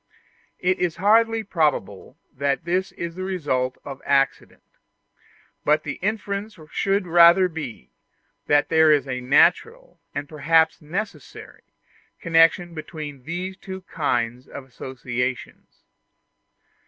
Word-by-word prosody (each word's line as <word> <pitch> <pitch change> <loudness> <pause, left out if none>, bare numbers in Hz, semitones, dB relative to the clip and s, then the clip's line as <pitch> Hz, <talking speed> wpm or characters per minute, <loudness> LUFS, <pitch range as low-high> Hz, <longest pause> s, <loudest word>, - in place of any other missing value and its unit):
It 185 +1 0
is 175 -2 0
hardly 225 +4 +3
probable 150 - -2 0.2
that 140 +4 -1
this 185 +2 -1
is 170 -1 -5
the 185 - -8
result 145 -9 -2
of 140 -1 -8
accident; 135 -1 0 1.0
but 150 +1 +2
the 140 - -6
inference 205 0 -3
should 195 -1 0
rather 175 +2 +6
be, 150 - -8 0.6
that 145 0 +3
there 160 -1 +5
is 145 -2 +2
a 125 -1 -3
natural, 455 - +2 0.2
and 145 0 -4
perhaps 160 +2 +2
a - - -18
necessary, 180 -1 -7 0.6
connection 170 +1 +3
between 150 -4 -8
these 180 +4 -4
two 190 -1 -8
kinds 125 -8 -2
of 140 - -9
associations. 125 -1 -5
160 Hz, 115 wpm, -23 LUFS, 140-185 Hz, 1.0 s, rather